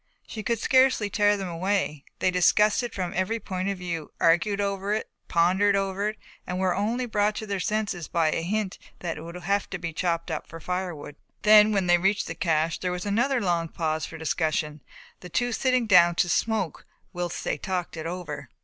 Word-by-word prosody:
She 220 - -6
could 230 +2 0
scarcely 260 -3 +3
tear 205 0 +3
them 195 -1 -4
away, 175 -4 -1
they 185 - +1
discussed 210 +5 +4
it 240 - -4
from 185 -1 -3
every 200 +4 0
point 190 -1 -3
of 200 - -2
view, 170 -4 -5
argued 175 +5 +3
over 200 0 -1
it, 220 - -4 0.2
pondered 185 +4 +3
over 195 +1 0
it 215 - -7 0.3
and 180 - -3
were 185 -1 +1
only 230 +6 -1
brought 210 -2 +1
to 215 - -4
their 200 -2 -2
senses 205 -4 -2
by 165 -2 +1
a - - -1
hint 195 +2 -2 0.2
that 170 -3 -3
it - - -7
would 170 +2 -9
have 195 +3 -1
to 195 - -4
be 170 -2 -5
chopped 170 0 -1
up 155 - -4
for 165 - -9
firewood. 175 -5 -4 0.3
Then, 215 0 +7
when 195 -3 +1
they 175 0 +4
reached 195 +3 +1
the 165 - -4
cache, 165 0 0
there 180 - -2
was 180 +1 -4
another 240 +6 +1
long 175 -5 0
pause 160 -1 -2
for 165 - -9
discussion, 155 -1 -1 0.4
the 180 - -10
two 245 +7 0
sitting 255 0 +1
down 175 -5 +6
to 175 - +2
smoke 210 -5 -1 0.3
whilst 175 -1 -4
they - - -2
talked 185 -4 -3
it 160 0 -5
over. 150 -6 -6
185 Hz, 205 wpm, -26 LUFS, 170-205 Hz, 0.4 s, Then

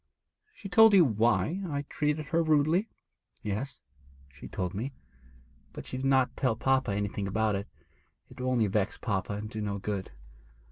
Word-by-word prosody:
'She 205 - -8
told 220 +2 +7
you 180 -4 +7
why 120 - +1
I 145 -3 -2
treated 150 +1 -2
her 165 0 +2
rudely?' 160 +6 +2 0.5
'Yes, 110 +7 -4 0.5
she 70 - -10
told 90 -1 -3
me, 120 +8 -4 0.8
but - - -8
she 130 - -5
did 135 +1 -1
not 130 -2 +3
tell 130 -5 +1
papa 130 0 +1
anything 100 0 -2
about 110 +2 +1
it; 100 +1 -3 0.6
it - - -15
would 125 - -2
only 120 -4 +2
vex 105 +1 0
papa 100 -3 -2
and 105 +1 -4
do 110 0 -5
no 100 -1 -2
good. 100 -1 -4
125 Hz, 170 wpm, -29 LUFS, 105-145 Hz, 0.8 s, told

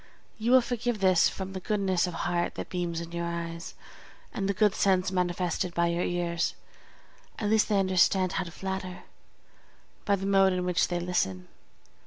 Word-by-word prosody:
You 225 +2 -1
will 260 0 +7
forgive 240 -2 -2
this 185 -3 +4
from 190 0 -6
the 190 - -4
goodness 190 -2 0
of 175 - -5
heart 175 0 -1
that - - -6
beams 175 -2 -2
in 170 0 -8
your 170 0 -3
eyes, 170 0 -5 0.6
and 195 -2 -2
the - - +2
good 210 0 +3
sense 190 -2 +2
manifested 180 -1 -1
by 170 0 +2
your 170 +1 -1
ears; 170 -1 -1 0.8
at 210 -1 -1
least 220 0 +3
they 205 -2 +3
understand 185 0 +3
how 190 - -2
to 170 - -8
flatter, 190 0 -5 1.0
by 200 - +2
the 195 0 -5
mode 195 -1 +4
in 180 0 -1
which 180 0 +2
they 175 -1 -2
listen. 95 - -2
185 Hz, 180 wpm, -28 LUFS, 175-195 Hz, 1.0 s, will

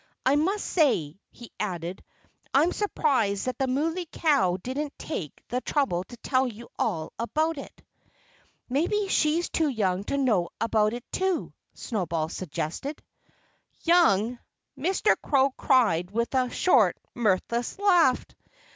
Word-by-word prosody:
I 265 +2 +4
must 380 +8 0
say," 195 - +1
he 240 - -13
added, 180 -3 -4 0.5
"I'm 310 +6 +5
surprised 265 - 0
that 255 -1 -3
the 265 - +1
Muley 325 +7 -1
Cow 195 - +2
didn't 275 +8 -4
take 175 - -6
the 250 +1 -1
trouble 255 - 0
to 240 - -12
tell 260 +2 +1
you 235 0 -9
all 165 -8 -1
about 310 +6 0
it." - - -11 0.8
"Maybe 360 +10 0
she's 325 +1 +2
too 315 -2 +1
young 195 -6 0
to 280 - -1
know 220 -11 +2
about 220 -1 +2
it, 240 0 -6
too," 375 -2 -1 0.2
Snowball 170 -8 -2
suggested. 170 - -4 0.8
"Young!" 245 - +3 0.4
Mr. 370 +9 +2
Crow 275 -1 +3
cried 195 -11 +2
with 235 +5 -2
a 255 -1 +2
short, 365 - +3 0.2
mirthless 235 +2 0
laugh. 355 -10 +4
255 Hz, 130 wpm, -26 LUFS, 200-305 Hz, 0.8 s, I'm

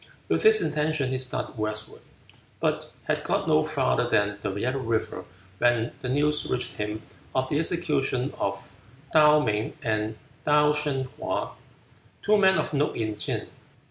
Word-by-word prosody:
With - - +2
this 435 -1 +6
intention 150 -3 0
he 130 - -1
started 130 -2 -3
westward, 110 0 -4 0.6
but - - -1
had - - -1
got - - 0
no - - +4
farther - - +1
than 105 0 +1
the 100 - -2
Yellow 130 +5 -1
River 110 -6 -2 0.3
when 120 -1 +2
the 125 - -3
news 150 +3 +1
reached 125 -2 -2
him 105 +1 -3 0.3
of 130 0 +1
the 145 - +1
execution 145 -6 0
of 100 0 -3 0.4
Tuh 150 -1 +7
Ming 105 +1 -1
and 110 -1 -1 0.3
Tuh 150 0 +4
Shun 150 -3 -1 0.2
hwa, - - -2 0.7
two 215 - +4
men 190 -3 +5
of 155 - -1
note 145 +1 0
in 110 -2 -2
Tsin. - - -2
130 Hz, 155 wpm, -26 LUFS, 110-150 Hz, 0.7 s, Tuh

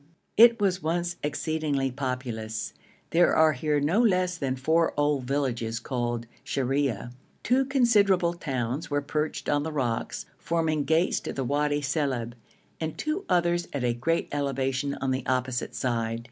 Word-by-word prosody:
It 230 +1 +7
was 190 -2 +1
once 175 +2 -1
exceedingly 150 -2 -1
populous; 120 -4 -4 0.4
there 175 +1 +4
are 160 -1 +5
here 150 +2 0
no 165 +10 +2
less 185 -5 +2
than 135 -5 -2
four 160 +5 +1
old 145 -3 +1
villages 120 -4 -1
called 120 -2 -2 0.2
Shariah; 135 -4 -1 0.3
two 260 +3 +3
considerable 205 -10 +3
towns 135 -3 -3
were 145 -1 0
perched 150 +1 -2
on 145 0 +2
the 160 +2 -3
rocks, 125 -6 -2
forming 160 -3 0
gates 160 +3 +2
to - - -5
the 135 - -2
Wadi 145 +3 +1
Silib, 130 -5 -1 0.5
and 160 -1 -4
two 310 +5 -2
others 175 -1 +2
at 140 -3 -2
a 120 -1 +2
great 165 +8 0
elevation 135 -1 -1
on 135 0 -2
the 130 0 -1
opposite 130 -1 -1
side. 115 -2 -1
145 Hz, 150 wpm, -27 LUFS, 130-165 Hz, 0.5 s, It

